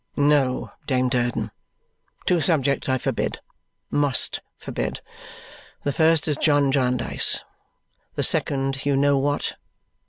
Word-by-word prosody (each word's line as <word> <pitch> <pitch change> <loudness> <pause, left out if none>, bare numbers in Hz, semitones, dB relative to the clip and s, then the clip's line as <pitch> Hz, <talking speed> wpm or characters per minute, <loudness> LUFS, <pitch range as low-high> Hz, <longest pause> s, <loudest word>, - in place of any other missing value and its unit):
"No, 145 -3 +2 0.2
Dame 130 -2 +1
Durden! 120 -1 -1 0.7
Two 175 -3 +2
subjects 140 -3 +1
I 130 - +2
forbid - - -2 0.5
must 145 -3 +1 0.2
forbid. - - -4 0.8
The 145 - 0
first 160 +1 +3
is 150 - 0
John 145 -3 +3
Jarndyce. 125 -2 +2 0.7
The - - -1
second, 135 -1 0
you 140 -1 +1
know 140 0 +3
what. 145 +1 -1
140 Hz, 115 wpm, -23 LUFS, 130-145 Hz, 0.8 s, first